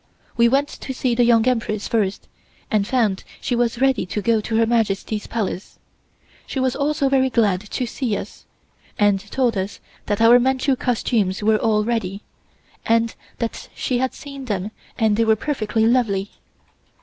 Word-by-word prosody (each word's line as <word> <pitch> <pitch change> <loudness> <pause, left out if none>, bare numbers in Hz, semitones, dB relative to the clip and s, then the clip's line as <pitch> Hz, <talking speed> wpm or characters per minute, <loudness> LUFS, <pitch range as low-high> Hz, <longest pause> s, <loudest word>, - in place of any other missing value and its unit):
We 235 0 +4
went 275 +3 +2
to 265 - -7
see 250 -1 0
the 240 +1 +3
Young 235 0 +4
Empress 225 -4 0
first, 205 -4 -1 0.4
and 205 -2 +1
found 220 -7 +1 0.2
she 245 - -1
was 235 0 0
ready 265 -1 +2
to 210 - -3
go 225 0 +2
to 220 +1 -3
Her 225 0 +4
Majesty's 220 -2 0
Palace. 205 -4 -4 0.7
She 270 - -3
was 260 -1 +1
also 285 0 +1
very 265 -1 +3
glad 205 -7 +2
to 250 - -2
see 235 -3 -2
us, - - -9 0.5
and 205 -2 +3
told 250 -2 +1
us 190 +2 -4 0.3
that 205 - 0
our 230 +2 +7
Manchu 265 +2 +1
costumes 220 -6 0
were 215 0 +4
all 210 -1 +2
ready, 210 -4 -2 0.6
and 230 0 +2 0.2
that 230 -1 -4
she 250 -2 -1
had 260 0 -1
seen 275 -2 -9
them 205 -3 -3 0.3
and 215 -2 +2
they 230 - +3
were 220 -1 +4
perfectly 220 -3 -1
lovely. 220 -5 +1
230 Hz, 170 wpm, -21 LUFS, 210-255 Hz, 0.7 s, our